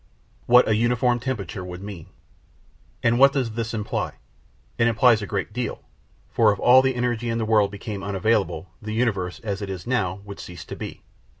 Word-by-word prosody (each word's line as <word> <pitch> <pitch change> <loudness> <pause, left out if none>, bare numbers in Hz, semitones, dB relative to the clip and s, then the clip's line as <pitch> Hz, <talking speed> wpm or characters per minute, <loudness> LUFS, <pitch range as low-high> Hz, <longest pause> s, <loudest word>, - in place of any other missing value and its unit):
What 125 +1 +6
a 110 - +3
Uniform 120 +2 +2
Temperature 110 -7 -4
would 90 +1 -8
mean 95 -4 -8 1.0
And 120 +1 +3
what 140 +1 +7
does 130 -5 -1
this 115 0 -3
imply? 110 -2 -3 0.7
It 115 - +4
implies 115 0 +4
a 100 - -5
great 100 0 -3
deal: 125 -1 -4 0.5
for 110 -2 +4
if 100 - -2
all 125 +5 +6
the 130 -1 0
energy 120 -1 -1
in 115 - -1
the 115 - -1
world 105 -2 +3
became 100 0 -6
unavailable, 100 -3 0
the 110 +1 -5
universe, 100 -7 -1
as 100 -2 -3
it 100 - -4 0.2
now 120 -8 0
is, 100 - -17
would 100 -1 -9
cease 85 -2 -9
to - - -7
be. - - -8
110 Hz, 190 wpm, -24 LUFS, 100-120 Hz, 1.0 s, what